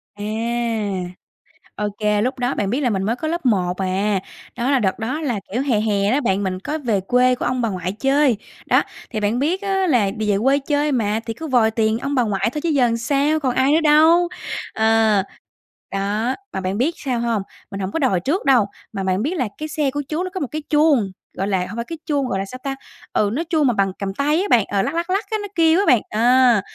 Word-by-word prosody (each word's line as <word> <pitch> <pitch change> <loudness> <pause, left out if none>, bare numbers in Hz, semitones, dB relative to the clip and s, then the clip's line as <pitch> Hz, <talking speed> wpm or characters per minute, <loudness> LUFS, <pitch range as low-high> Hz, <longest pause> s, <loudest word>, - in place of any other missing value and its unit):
À, 205 - -9 1.5
ô 210 0 -2
kê. 210 -1 +2
Lúc 255 +2 -1
đó 245 +2 0
bạn 200 - -1
biết 250 +7 0
là 250 - +2
mình 195 -3 -1
mới 225 +4 0
có 315 - -4
lớp 340 -2 -3
1 180 -6 +1
à. 195 +2 0 0.4
Đó 245 +3 0
là 270 - +3
đợt 195 0 0
đó 260 +8 -3
là, 240 -9 -1
kiểu, 250 - +1
hè 250 -7 +1
hè 205 -1 +1
đó 285 +3 +2
bạn, 200 -4 0
mình 185 -1 -2
có 300 +10 -3
về 230 -9 0
quê 250 +5 +3
của - - -4
ông 255 0 0
bà 230 - 0
ngoại 185 -2 -3
chơi. 270 +2 +2 0.3
Đó, - - +4 0.3
thì 220 - -3
bạn 215 +4 0
biết 345 +8 0
á 385 -2 0
là 235 -9 +3
vì 215 -1 -1
về 195 - +2
quê 275 +2 +4
chơi 290 +1 0
mà, 220 -4 0
thì 225 - -3
cứ 320 +7 -7
vòi 240 -5 +3
tiền 220 0 +1
ông 275 +2 -2
bà 250 - +3
ngoại 205 0 0
thôi 300 - -3
chứ 340 - -1
giờ 260 -6 +3
sao, 285 +5 +1
còn 255 -4 -1
ai 265 +2 +3
nữa 320 +2 +4
đâu. 320 +3 +5 0.5
Ờ, 220 -2 +3 0.7
đó, 210 +6 -1 0.2
mà 190 - -3
bạn 185 +2 -2
biết 310 +8 +1
sao 255 -4 -2
hông? 230 -3 0 0.3
Mình 195 - -5
hổng 190 - -3
có 325 - -2
đòi 250 - +2
trước 290 - -1
đâu, 250 -6 +5 0.3
mà 195 - -3
bạn 190 +1 0
biết 335 +6 -1
là 255 - 0
cái 310 - -4
xe 300 -3 -1
của 290 +2 -2
chú 320 +4 -1
nó 370 - -3
có 375 - -3
một 285 - -2
cái 310 0 -3
chuông, 295 -10 +3 0.3
gọi 195 - -1
là, 195 -2 +1
hông - - -8
phải 235 - -3
cái 330 - -6
chuông 285 -4 0
gọi 195 -5 -1
là 195 - -2
sao 255 +6 -9
ta? 275 -1 -2 0.4
Ừ, 205 - +2
nó 320 +6 -1
chuông 310 -5 +2
mà 245 - +3
bằng 195 -2 +1
cầm 195 -1 -3
tay 295 - +1
á 405 - -1
bạn, 225 -5 +4
ờ, 200 -1 0
lắc, 275 +10 -2
lắc, 340 +2 -2
lắc 390 +3 0
á, 435 - +1
nó 410 - -5
kêu 330 +1 +4
á 400 - +2
bạn. 245 -7 +5
Ờ, 240 0 +4
245 Hz, 255 wpm, -21 LUFS, 205-295 Hz, 1.5 s, đâu